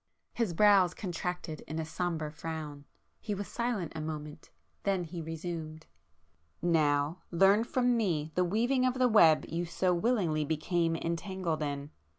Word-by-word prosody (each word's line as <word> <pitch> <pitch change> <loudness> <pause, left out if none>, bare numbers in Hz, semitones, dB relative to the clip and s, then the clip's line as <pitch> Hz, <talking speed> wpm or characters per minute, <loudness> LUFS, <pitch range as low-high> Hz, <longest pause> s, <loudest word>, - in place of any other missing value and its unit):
His 215 -8 -1
brows 195 -3 +5
contracted 180 -4 -4
in 155 - -5
a 160 - -2
sombre 160 -2 -3
frown,—he 155 +6 -7
was 200 0 -5
silent 235 -8 -2
a 160 - -5
moment,—then 155 +5 -5
he 170 0 -6
resumed— 160 -1 -6 0.7
"Now 155 -1 +2
learn 195 +5 +4
from 245 0 +1
me 165 -9 0
the 180 - +2
weaving 235 +8 +1
of 255 0 +2
the 255 -1 +3
web 170 -9 +6
you 170 +2 -2
so 180 +2 +1
willingly 175 -6 +1
became 165 +2 0
entangled 170 0 -2
in! 145 0 -3
170 Hz, 140 wpm, -31 LUFS, 155-200 Hz, 0.7 s, web